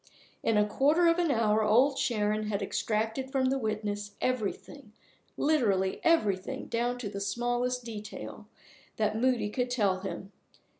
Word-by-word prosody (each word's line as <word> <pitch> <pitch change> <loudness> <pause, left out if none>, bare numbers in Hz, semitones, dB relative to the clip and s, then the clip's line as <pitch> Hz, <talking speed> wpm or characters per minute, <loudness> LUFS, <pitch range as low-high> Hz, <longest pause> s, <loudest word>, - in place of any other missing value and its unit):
In 225 - +2
a 210 - +4
quarter 290 +10 +3
of 335 +1 +4
an 345 -2 +2
hour 220 -4 +2
Old 245 +7 +4
Sharon 215 -3 0
had 205 -1 -1
extracted 225 +6 -2
from 260 -1 +1
the 270 - 0
witness 210 -2 -3
everything, 255 0 -3 0.4
literally 205 -11 +1
everything 205 - +1
down 240 +1 -1
to 245 -4 -5
the 200 0 -5
smallest 245 +4 -1
detail, 215 -2 -8 0.5
that 215 -1 +1
Moody 240 -2 +1
could 250 +2 -1
tell 205 -7 +1
him. 195 0 -6
225 Hz, 145 wpm, -29 LUFS, 210-255 Hz, 0.5 s, a